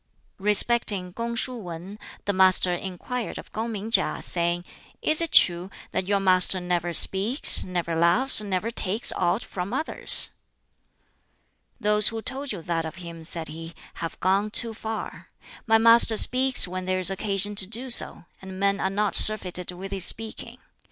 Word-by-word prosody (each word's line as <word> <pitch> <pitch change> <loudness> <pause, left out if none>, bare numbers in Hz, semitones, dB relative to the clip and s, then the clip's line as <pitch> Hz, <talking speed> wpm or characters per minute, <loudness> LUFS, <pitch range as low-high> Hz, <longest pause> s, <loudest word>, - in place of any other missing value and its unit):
Respecting 205 -2 +2
Kung 235 +2 -6
shuh 250 +1 -3
Wan, 185 +1 -10 0.3
the 205 - -2
Master 185 -1 +3
inquired 195 +7 -7
of - - -13
Kung 225 +2 -5
ming 215 +1 -8
KiŠ, - - -1
saying, 175 0 -2 0.4
"Is 310 +1 +1
it 330 - -4
true 175 +1 +2 0.2
that 185 - -4
your 200 0 0
master 185 -1 +3
never 175 -1 -3
speaks, 200 - +5
never 175 -2 -5
laughs, 190 +10 +2
never 205 +2 -4
takes 210 +1 +1
aught 190 +6 -2
from 185 +1 -7
others?" 315 - 0 1.5
"Those 210 -1 +4
who 225 - 0
told 275 +1 -6
you 185 -6 -8
that 165 -1 -4
of 160 0 -9
him," 170 -3 -11
said 160 -1 -2
he, 165 +2 -11 0.3
"have 165 - -7
gone 195 +3 -1
too 230 +1 +3
far. 220 0 -9 0.4
My 225 0 +3
master 230 0 +5
speaks 255 -2 +3
when 185 +1 -7
there 185 0 -2
is 185 +1 +2
occasion 200 +1 -1
to 190 - +2
do 240 +5 -4
so, 235 - +2 0.2
and 190 -1 -11
men 200 0 -1
are 190 - -2
not 205 +1 -3
surfeited 180 -4 +4
with 190 +2 -10
his 190 -3 +2
speaking. 225 0 -2
195 Hz, 165 wpm, -23 LUFS, 180-225 Hz, 1.5 s, speaks